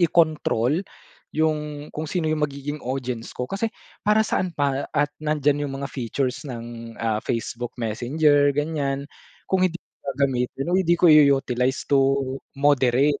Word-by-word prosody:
ikontrol 155 -4 +2 0.5
'yung 150 -1 -1
kung 155 - -4
sino 165 -2 -1
'yung 155 0 0
magiging 140 +1 -4
audience 125 -2 -3
ko, 125 - -4
kasi 200 +4 -1 0.4
para 210 +1 +4
saan 185 -4 -1
pa 140 -3 0
at 145 0 +2
nandiyan 150 -1 +1
'yung 135 -1 -4
mga 140 - -3
features 130 +2 -2
ng, 115 -1 -7
ah, 110 -1 0
Facebook, 120 +1 -3
Messenger 145 +6 +2
ganiyan 145 -2 -1 0.4
kung 190 - +2
hindi 175 -2 0 0.2
gagamitin 135 0 -1
o - - +4
hindi 175 -2 +3
ko 175 - +5
i-u-utilize 135 -3 +3
to 135 -1 +4 0.4
moderate 140 0 +3
140 Hz, 140 wpm, -24 LUFS, 125-155 Hz, 0.5 s, ko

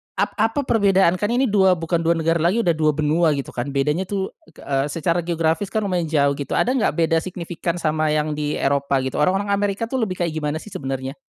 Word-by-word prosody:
ap - - 0
apa 225 +6 +1
perbedaan 195 -7 +3
kan 205 - 0
ini 245 +2 +2
dua 190 -3 +4
bukan 165 0 -1
2 165 +1 +2
negara 165 +1 +1
lagi, 180 +9 +2
udah 175 - +3
2 155 -1 +2
benua 155 +1 +2
gitu 140 - -5
kan, 120 +2 -4
bedanya 150 +6 0
tuh, 195 -1 -3 0.2
e 160 - -22
ke - - -15
eee, 135 0 0
secara 165 +3 -1
geografis 165 +2 0
kan 215 +2 -2
lumayan 180 -4 -1
jauh 145 -2 +2
gitu, 140 - -3
ada 250 - +2
nggak 260 -4 +1
beda 165 -1 +2
signifikan 170 -1 -4
sama 155 -2 0
yang 155 0 0
di 150 0 -2
Eropa 140 0 0
gitu, 130 - -3
orang-orang 195 +6 +1
Amerika 200 +1 0
tuh 265 - 0
lebih 200 -5 -1
kayak 170 - -1
gimana 150 -1 -2
sih 185 +6 -7
sebenernya? 135 +1 -5
165 Hz, 230 wpm, -21 LUFS, 150-195 Hz, 0.2 s, dua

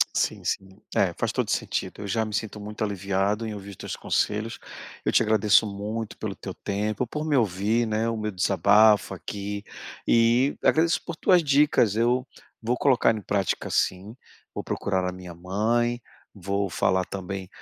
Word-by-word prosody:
Sim, - - 0
sim. 95 - -2 0.3
É, - - +2
faz - - -1
todo - - -1
o - - -2
sentido, - - -2
eu 100 - -5
já 110 +3 0
me 110 - -7
sinto 110 0 -3
muito 105 +1 -5
aliviado 100 +1 -1
em 110 - -4
ouvir 100 -1 -8
os - - -10
teus - - -6
conselhos, 110 +2 -1 0.5
eu - - +2
te - - +4
agradeço 110 -1 +4
muito 105 +2 -5
pelo - - -4
teu - - -7
tempo, 105 +3 -2
por 150 +6 -4
me 150 -2 +1
ouvir, 110 +1 +1
né, 110 +1 0
o 115 - -2
meu 105 0 -2
desabafo 100 +3 +4
aqui, 100 0 -5 0.4
e 120 +4 +3
agradeço 165 +2 +3
por 170 - -5
tuas 180 +1 +4
dicas, 140 -7 +3
eu 120 +3 +2 0.4
vou 120 +2 0
colocar 125 -5 +3
em 110 - -5
prática 100 -1 -1
sim, 95 +5 -1 0.4
vou - - -3
procurar 95 -2 -1
a 90 - -1
minha 90 -2 -10
mãe, 115 +7 0 0.3
vou 100 +1 -2
falar 95 +1 +1
também 95 0 -6
105 Hz, 175 wpm, -25 LUFS, 100-115 Hz, 0.5 s, te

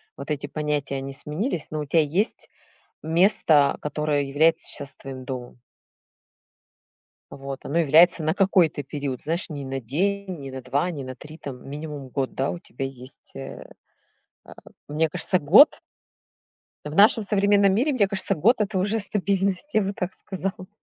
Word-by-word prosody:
вот - - -9
эти 145 -1 -2
понятия 145 -2 -2
они 135 0 -5
сменились, 155 - -3
но 155 - -3
у 150 - -3
тебя 160 +3 +3
есть 180 +10 -1 0.5
место, 160 -4 +4
которое 150 0 -1
является 160 +4 +2
щас 140 -1 -5
твоим 130 -1 -9
домом. 125 -2 -7 1.7
Вот 135 -1 -8
оно 160 +5 0
является 165 +2 +5
на 155 +2 +1
какой-то 185 -6 +2
период. 140 -2 -5
Знаешь, 165 +4 -2
не 145 -2 -5
на 135 0 -4
день, 185 - -2
не 135 - -7
на 130 -1 -7
2, 140 +8 0
не 145 -5 -6
на 130 0 -7
3, 150 +5 -12
там 135 -5 -9
минимум 145 -1 -7
год. 130 0 -3
Да, 135 +1 -1
у - - -5
тебя 135 -6 -6
есть, 130 0 -11
э, 135 0 -9 0.7
а, - - -14 0.4
мне 155 +2 +1
кажется, 180 +4 0
год 200 - +6 1.0
В 150 - -6
нашем 210 +3 +5
современном 200 -1 +3
мире, 265 +8 +2
мне 220 -7 +3
кажется, 195 0 0
год 220 - +4
это 205 -2 0
уже 205 +4 0
стабильность, 200 +4 -1
я 215 - +4
бы 195 +1 -2
так 185 -2 -4
сказала. 190 -1 -5
155 Hz, 165 wpm, -24 LUFS, 140-195 Hz, 1.7 s, год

